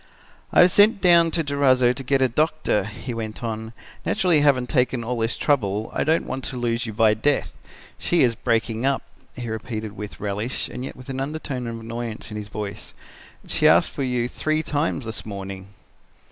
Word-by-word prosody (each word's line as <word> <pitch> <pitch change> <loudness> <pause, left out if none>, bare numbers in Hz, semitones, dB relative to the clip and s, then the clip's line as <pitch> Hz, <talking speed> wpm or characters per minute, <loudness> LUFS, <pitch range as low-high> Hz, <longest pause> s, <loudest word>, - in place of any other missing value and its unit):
"'I - - +6
have 180 +1 +6
sent 205 +2 +5
down 170 -3 +6
to 165 0 +1
Durazzo 130 -4 +3
to 135 - -7
get 135 +1 +2
a - - +5
doctor,' 150 - +1
he 110 +4 -6
went 110 0 -5
on; 110 -1 -4 0.3
'naturally 175 -5 +2
having 140 -4 +3
taken 125 -2 +1
all 120 +1 -2
this 115 +1 -1
trouble 110 -7 0
I - - 0
don't 160 +2 +2
want 130 0 -4
to 130 - -5
lose 120 0 -1
you 110 - -5
by 110 0 +4
death. 135 +7 0 0.5
She 175 -4 +2
is 120 -2 +3
breaking 115 0 -1
up,' 135 0 +1 0.3
he 120 -1 -5
repeated 110 -1 -4
with 105 0 -8
relish 105 +5 -3
and 125 - -6
yet - - -6
with 130 +1 -12
an 135 0 -3
undertone 135 -3 -4
of 115 0 -5
annoyance 115 0 -6
in 105 - -5
his 105 -1 -6
voice; 105 -1 -6 0.5
'she - - +2
asked - - +5
for - - -5
you 125 -2 0
three 155 +4 -1
times 145 -4 -1
this 110 -1 -4
morning.' 95 -2 -7
125 Hz, 195 wpm, -23 LUFS, 110-140 Hz, 0.5 s, I